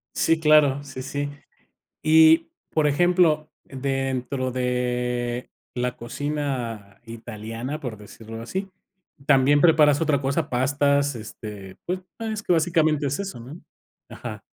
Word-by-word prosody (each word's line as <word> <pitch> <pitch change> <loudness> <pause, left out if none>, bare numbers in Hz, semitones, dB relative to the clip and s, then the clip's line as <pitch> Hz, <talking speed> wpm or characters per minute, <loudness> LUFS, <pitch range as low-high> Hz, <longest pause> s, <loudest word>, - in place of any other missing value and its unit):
Sí 165 0 +2
claro, 150 -3 +4
sí, 130 -2 -8
sí. 145 +2 -3 0.7
Y, 160 +1 +6 0.2
por 155 -2 +2
ejemplo, 160 -1 +3
dentro 135 -1 -2
de 125 -1 -1 0.2
la 125 0 -2
cocina 120 -6 -4
italiana, 115 +4 -6
por 120 -6 -6
decirlo 110 +2 -10
así. 190 +11 -4 0.6
¿También 140 +1 +4
preparas 155 -3 +5
otra 145 -3 +2
cosa? 135 +1 -1
Pastas, 140 +2 +1
este, 105 -3 -9
pues 185 +1 -2 0.2
es 220 -2 -4
que - - -1
básicamente 160 -3 +2
es 140 - -2
eso, 195 -9 -5
¿no? 135 +9 -10 0.5
Ajá. - - -8
140 Hz, 120 wpm, -24 LUFS, 125-155 Hz, 0.7 s, Y